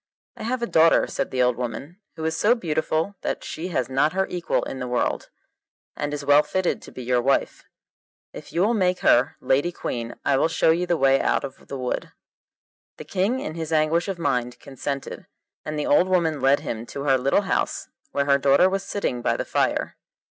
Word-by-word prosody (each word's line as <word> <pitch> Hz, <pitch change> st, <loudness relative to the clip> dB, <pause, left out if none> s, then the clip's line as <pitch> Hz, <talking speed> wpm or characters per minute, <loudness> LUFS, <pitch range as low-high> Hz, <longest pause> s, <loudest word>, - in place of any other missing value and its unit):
'I -, -, -9 dB
have 245 Hz, +1 st, -2 dB
a -, -, +3 dB
daughter,' 165 Hz, -6 st, +4 dB
said -, -, -3 dB
the 125 Hz, -1 st, +1 dB
old 125 Hz, -1 st, +1 dB
woman, 125 Hz, -, -6 dB, 0.2 s
'who 160 Hz, -, -5 dB
is 160 Hz, 0 st, 0 dB
so 215 Hz, +8 st, +3 dB
beautiful 160 Hz, -2 st, -1 dB
that -, -, -3 dB
she 165 Hz, +3 st, -5 dB
has 130 Hz, -9 st, -1 dB
not 135 Hz, +4 st, +1 dB
her 190 Hz, +1 st, +1 dB
equal 175 Hz, -1 st, -1 dB
in 135 Hz, -, -6 dB
the 125 Hz, -, -4 dB
world, 125 Hz, 0 st, -1 dB, 0.7 s
and 145 Hz, 0 st, -3 dB
is 145 Hz, -1 st, -5 dB
well 145 Hz, +1 st, +6 dB
fitted 185 Hz, +3 st, -1 dB
to -, -, -12 dB
be 130 Hz, -, -8 dB
your 125 Hz, 0 st, +1 dB
wife; 135 Hz, +3 st, 0 dB, 0.7 s
if -, -, -10 dB
you 170 Hz, -, 0 dB
will 215 Hz, +5 st, +3 dB
make 185 Hz, -4 st, +1 dB
her 125 Hz, +2 st, +4 dB
lady 135 Hz, +6 st, +1 dB
queen 120 Hz, -7 st, -5 dB
I 140 Hz, -, +3 dB
will 150 Hz, -, +3 dB
show 160 Hz, 0 st, +2 dB
you 175 Hz, +2 st, 0 dB
the 175 Hz, -1 st, +1 dB
way 135 Hz, -1 st, +4 dB
out -, -, +1 dB
of 135 Hz, -1 st, -9 dB
the 140 Hz, -, -5 dB
wood.' 125 Hz, -1 st, -3 dB, 0.8 s
The -, -, -9 dB
King 205 Hz, +8 st, 0 dB
in 155 Hz, -, -5 dB
his 165 Hz, -1 st, -5 dB
anguish 160 Hz, +3 st, +2 dB
of 195 Hz, -2 st, -3 dB
mind 125 Hz, -6 st, -1 dB
consented, 140 Hz, +1 st, -6 dB, 0.4 s
and 155 Hz, 0 st, -4 dB
the 150 Hz, -, -1 dB
old 175 Hz, +5 st, +4 dB
woman 165 Hz, -6 st, +1 dB
led 135 Hz, +2 st, +4 dB
him 115 Hz, +1 st, -5 dB
to 140 Hz, -, -6 dB
her 135 Hz, -2 st, +3 dB
little 135 Hz, +9 st, +2 dB
house 190 Hz, -, -1 dB, 0.2 s
where 140 Hz, 0 st, 0 dB
her 140 Hz, 0 st, +3 dB
daughter 140 Hz, +6 st, +5 dB
was 195 Hz, +1 st, -1 dB
sitting 195 Hz, -11 st, -3 dB
by -, -, 0 dB
the -, -, -3 dB
fire. -, -, -1 dB
150 Hz, 215 wpm, -24 LUFS, 135-175 Hz, 0.8 s, well